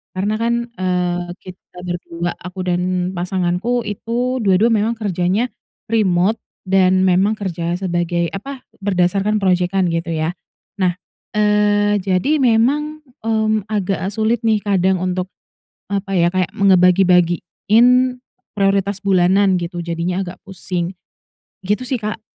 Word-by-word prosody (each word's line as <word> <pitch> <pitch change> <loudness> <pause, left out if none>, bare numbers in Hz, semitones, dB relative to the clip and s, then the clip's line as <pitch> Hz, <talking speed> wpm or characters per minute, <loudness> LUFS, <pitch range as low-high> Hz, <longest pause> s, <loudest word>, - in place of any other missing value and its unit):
Karena 200 +3 -1
kan, 235 +1 +1 0.2
eee, 180 -2 -1 0.2
kita 180 -1 -14
berdua, 175 -1 -4
aku 185 +1 -9
dan 180 +1 0
pasanganku 185 +6 -1
itu 240 +5 -2
dua-dua 200 +2 +3
memang 220 +2 +1
kerjanya 200 +3 0 0.4
remote 200 -1 +2 0.3
dan 185 0 +3
memang 195 +4 +2
kerja 175 -2 -2
sebagai 175 -2 -1
apa, 265 +6 -8 0.2
berdasarkan 195 +2 +1
projekan 185 0 +1
gitu 165 0 -2
ya. 160 +2 -1 0.5
Nah, 180 -1 +1 0.4
eee, 205 -1 +2
jadi 195 +11 +1
memang, 275 +6 +2 0.2
mmm, 220 -2 0
agak 195 -2 -1
sulit 220 +2 0
nih 220 -2 +2
kadang 190 -2 +1
untuk 185 0 -2 0.6
apa 195 -1 -2
ya, 170 0 +3
kayak 185 -2 0
me 200 -1 +3
ngebagi-bagiin 180 +4 +3 0.7
prioritas 200 0 0
bulanan 190 0 +3
gitu, 175 0 -5
jadinya 170 +3 -2
agak 175 0 -9
pusing. 180 -2 -4 0.7
Gitu 210 +5 0
sih 255 -1 -2
Kak. 215 +1 -4
190 Hz, 125 wpm, -19 LUFS, 180-210 Hz, 0.7 s, dua-dua